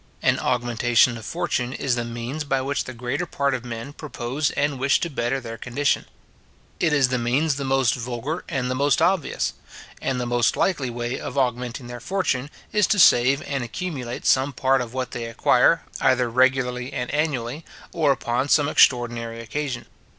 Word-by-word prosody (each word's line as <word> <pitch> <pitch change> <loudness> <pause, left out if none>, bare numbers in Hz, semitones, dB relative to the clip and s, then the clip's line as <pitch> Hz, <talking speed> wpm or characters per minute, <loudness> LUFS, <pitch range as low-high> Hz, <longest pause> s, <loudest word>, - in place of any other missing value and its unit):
An - - +3
augmentation 120 0 +2
of 110 -1 -8
fortune 155 -8 -2
is 135 -2 -1
the 120 -1 0
means 120 +6 -4
by 135 -2 0
which 140 +2 -2
the 130 - -7
greater 125 +4 -3
part 140 -1 0
of 125 -2 -3
men 120 +3 -6
propose 145 -1 -3
and 145 -2 -1
wish 135 +1 +3
to 170 - -2
better 125 0 -1
their 115 -3 -8
condition. 135 +5 0 0.7
It 165 - +2
is 140 -3 +3
the 130 -1 0
means 135 +6 +1
the 140 - -3
most 135 -2 +2
vulgar 125 +6 -4
and 130 -5 -1
the - - +1
most 140 0 +2
obvious; 185 -5 +1 0.5
and 130 -2 -1
the 125 - -2
most 120 -1 +1
likely 145 -9 +1
way 120 +1 -3
of - - -6
augmenting 125 -1 -1
their 120 0 -7
fortune, 140 -3 -1 0.2
is 210 -4 +3
to 210 - +2
save 135 -5 +5
and 135 -3 -3
accumulate 125 -2 -5
some 135 +2 +3
part 135 +1 +2
of 120 0 -6
what 130 -2 -3
they 120 - -4
acquire, 125 +6 +3 0.2
either 125 -2 +2
regularly 125 0 +1
and 125 - -3
annually, 145 -2 -1 0.3
or 155 -4 +2
upon 130 +1 -1
some 145 -1 +4
extraordinary 120 -5 +2
occasion. 125 +3 -4
130 Hz, 180 wpm, -23 LUFS, 120-140 Hz, 0.7 s, save